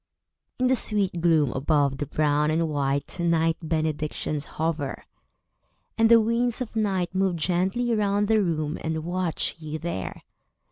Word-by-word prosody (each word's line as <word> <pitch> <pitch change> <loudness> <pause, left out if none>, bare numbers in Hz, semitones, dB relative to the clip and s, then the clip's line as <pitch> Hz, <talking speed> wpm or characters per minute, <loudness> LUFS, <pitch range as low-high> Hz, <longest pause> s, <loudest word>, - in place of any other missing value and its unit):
In 255 - +1
the 260 +1 +4
sweet 200 -7 0
gloom 160 -5 +3
above 140 0 +1
the 145 - -2
brown 150 0 +1
and 165 +1 +1
white 140 +2 -1
Night 165 -1 +2
benedictions 155 -2 -2
hover; 155 -4 -2 0.9
and 225 0 +4
the 230 -1 +8
winds 230 +2 0
of 245 -3 -5
night 190 -5 0
Move 190 -1 +1
gently 190 +8 0
round 205 -1 +1
the 220 0 +3
room, 155 -4 -1
and 160 -1 -2
watch 175 -1 -1
you 155 -1 -5
there. 160 - -5
165 Hz, 145 wpm, -25 LUFS, 155-200 Hz, 0.9 s, the